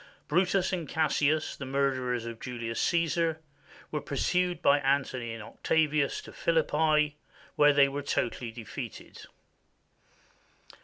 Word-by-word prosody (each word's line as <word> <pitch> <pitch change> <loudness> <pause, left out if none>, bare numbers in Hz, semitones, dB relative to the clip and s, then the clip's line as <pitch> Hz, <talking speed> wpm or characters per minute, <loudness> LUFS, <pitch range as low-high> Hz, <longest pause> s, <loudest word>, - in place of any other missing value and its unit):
Brutus 185 +3 +2
and 170 -6 -3
Cassius, 155 -1 +1
the - - -8
murderers 130 -3 0
of 115 -1 -7
Julius 115 -2 -4
Caesar, 165 -1 +1 0.5
were 150 - -2
pursued 180 +5 0
by 145 -4 +4
Antony 135 -4 0
and 115 -1 -7
Octavius 150 +4 0
to - - -12
Philippi, 155 -2 +2 0.4
where 145 0 +6
they 140 -1 +5
were 140 +1 -4
totally 120 -3 -2
defeated. 115 -3 -8
145 Hz, 115 wpm, -29 LUFS, 130-160 Hz, 0.5 s, where